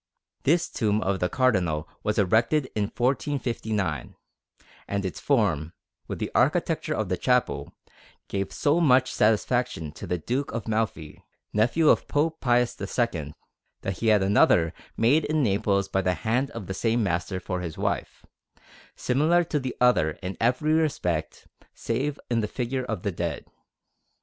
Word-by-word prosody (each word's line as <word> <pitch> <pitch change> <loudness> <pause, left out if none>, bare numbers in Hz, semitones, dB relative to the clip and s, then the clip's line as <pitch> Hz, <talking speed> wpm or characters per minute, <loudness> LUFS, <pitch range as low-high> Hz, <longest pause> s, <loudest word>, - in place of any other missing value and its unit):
This 170 +4 +3
tomb 105 -2 0
of 95 0 0
the 90 - 0
Cardinal 90 - +1
was 105 +1 -1
erected 115 - +2
in 105 -1 0
1459; 115 - -2 0.7
and 100 0 -2
its 95 - -4
form, 90 - +1 0.3
with - - -4
the - - -4
architecture - - +1
of - - -1
the - - -1
chapel, - - 0 0.5
gave 100 -1 -3
so 150 +4 +1
much 130 -4 +4
satisfaction 110 - +1
to - - -9
the 90 - 0
Duke 125 - -2
of 115 - -4
Malfi, 110 -9 -2 0.3
nephew 120 +10 +2
of - - +3
Pope 160 +2 0
Pius 120 -3 +1
II, 95 - -2 0.5
that 95 -3 -4
he 115 - -1
had 105 -3 +5
another 90 -4 +4 0.2
made 140 +8 +4
in 155 -1 +1
Naples 100 -2 +1
by 95 0 0
the 90 -1 +1
hand 120 - 0
of 115 -8 -7
the 95 - -4
same 115 +4 +1
master 95 0 -1
for 90 0 -4
his 85 -3 -6
wife, - - -3 0.7
similar 155 +7 +2
to 155 -3 -1
the 130 -2 -4
other 120 -11 +3
in 95 +1 -4
every 130 +7 +2
respect 90 - -1 0.3
save 140 +5 -2
in 120 -1 +1
the 105 - -1
figure 130 +3 -3
of 110 -7 -4
the 100 - 0
dead. 85 -3 -4
110 Hz, 155 wpm, -26 LUFS, 95-130 Hz, 0.7 s, had